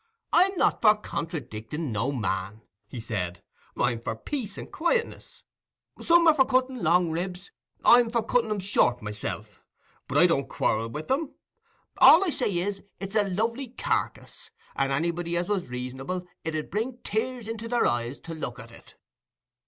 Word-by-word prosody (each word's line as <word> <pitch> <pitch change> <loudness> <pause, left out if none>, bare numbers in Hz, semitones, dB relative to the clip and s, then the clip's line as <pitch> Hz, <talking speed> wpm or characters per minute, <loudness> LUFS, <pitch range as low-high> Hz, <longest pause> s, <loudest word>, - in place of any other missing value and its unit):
"I'm 370 +2 +5
not - - +2
for 215 -1 +7
contradicking 150 - -5
no 110 +6 0
man," 105 -4 -3 0.2
he 120 - -7
said; 90 -6 -4 0.3
"I'm 120 -2 +1
for 115 - -4
peace 210 - -5
and - - -8
quietness. 460 +9 -2 0.6
Some 340 0 +5
are 320 - +8
for 280 -3 +5
cutting 260 0 +1
long 170 +1 +3
ribs—I'm 190 - +1
for 230 -1 0
cutting 230 0 +1
'em 210 - -1
short 125 - +2
myself; 105 -1 -6 0.5
but - - -1
I - - +7
don't - - +1
quarrel 110 +1 0
with 150 - -6
'em. 285 +2 -1 0.6
All 355 +5 +9
I 345 - 0
say 255 - 0
is, 195 +2 -2 0.2
it's 195 +1 -6
a 205 -2 +2
lovely 230 +8 -1
carkiss—and 135 - -3
anybody 170 +4 -1
as 175 +1 -1
was 200 -3 -1
reasonable, 130 +9 -5 0.2
it 160 0 -3
'ud 155 - -4
bring 230 +6 -2
tears 240 +1 -2
into 225 0 -5
their 240 0 +1
eyes 120 +3 -1
to 165 - -7
look 130 -6 -5
at 115 -1 -11
it." - - -17
180 Hz, 160 wpm, -27 LUFS, -, 0.6 s, All